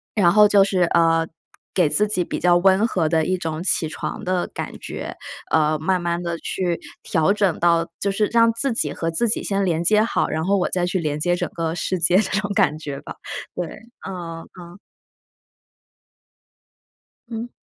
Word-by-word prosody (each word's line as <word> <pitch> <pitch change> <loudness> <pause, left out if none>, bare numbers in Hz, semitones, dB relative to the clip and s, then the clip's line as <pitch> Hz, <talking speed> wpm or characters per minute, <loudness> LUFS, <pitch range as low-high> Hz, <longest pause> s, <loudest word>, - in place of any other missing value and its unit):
然 175 -5 +4
后 210 0 +7
就 205 -1 +5
是， 195 -2 0
呃， 165 -1 +3 0.5
给 175 -5 +3
自 210 +7 +2
己 195 -4 0
比 - - -4
较 175 -1 +4
温 190 +4 +4
和 175 -7 0
的 160 -1 +2
一 185 +2 0
种 160 -1 -4
起 170 -3 +1
床 - - -5
的 180 -1 0
感 - - -6
觉， - - -6 0.4
呃， 155 -1 +3
慢 180 +3 0
慢 170 0 -1
地 170 -1 -3
去 175 -3 -2 0.3
调 160 +4 +2
整 200 -5 0
到 170 0 +3
就 200 - +1
是 210 +2 +1
让 230 0 +4
自 260 +2 -1
己 225 - 0
和 165 0 -2
自 230 +8 0
己 215 - 0
先 200 0 0
连 165 -2 0
接 210 +4 +4
好， 230 - 0
然 160 - -2
后 200 +2 +2
我 180 - 0
再 180 -1 0
去 185 +1 -1
连 150 -3 -2
接 175 +3 +1
整 - - -2
个 165 -1 -2
世 185 +2 -1
界 170 +2 +4
这 205 - +1
种 205 -1 -3
感 155 -5 +2
觉 145 -3 -6
吧。 - - -9 0.4
对， 175 - -2 0.4
嗯 170 -3 -6 0.2
嗯。 175 +2 -12 2.5
嗯。 230 +1 -5
175 Hz, 205 characters per minute, -22 LUFS, 165-200 Hz, 2.5 s, 后